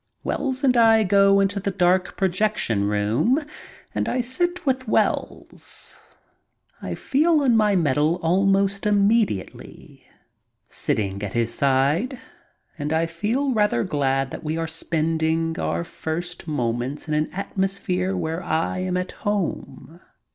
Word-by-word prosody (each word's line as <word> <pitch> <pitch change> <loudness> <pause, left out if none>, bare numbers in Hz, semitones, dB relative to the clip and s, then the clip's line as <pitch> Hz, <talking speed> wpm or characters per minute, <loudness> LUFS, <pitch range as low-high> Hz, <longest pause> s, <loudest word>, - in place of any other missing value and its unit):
Wells 270 -1 -2
and 255 -2 +4
I 225 -2 +5
go 195 0 +4
into 200 0 +1
the 200 - -2
dark 180 -1 +1
projection 185 - 0
room 105 - +1 0.5
and - - -1
I 255 - -1
sit 350 +9 -1
with 260 -2 0
Wells. - - -3 0.8
I - - -4
feel 305 +2 +2
on 250 -4 +3
my 210 -2 +3
mettle 150 -1 +2
almost 195 +3 +2
immediately, 205 - -1 0.6
sitting 100 -2 -2
at 105 -1 -4
his 115 0 0
side, 140 - +1 0.6
and 150 +1 -3
I 160 +1 +2
feel 225 +12 -1
rather 210 - +2
glad 135 -2 0
that - - -7
we 155 +1 -2
are 165 - -1
spending 160 0 -1
our - - -1
first 170 +1 -6
moments 125 0 -2
in 155 - -2
an 155 0 0
atmosphere 190 -1 -2
where 165 +1 -3
I 165 +2 -1
am 185 0 -1
at 180 0 -3
home. 190 -4 -4
180 Hz, 135 wpm, -23 LUFS, 155-210 Hz, 0.8 s, I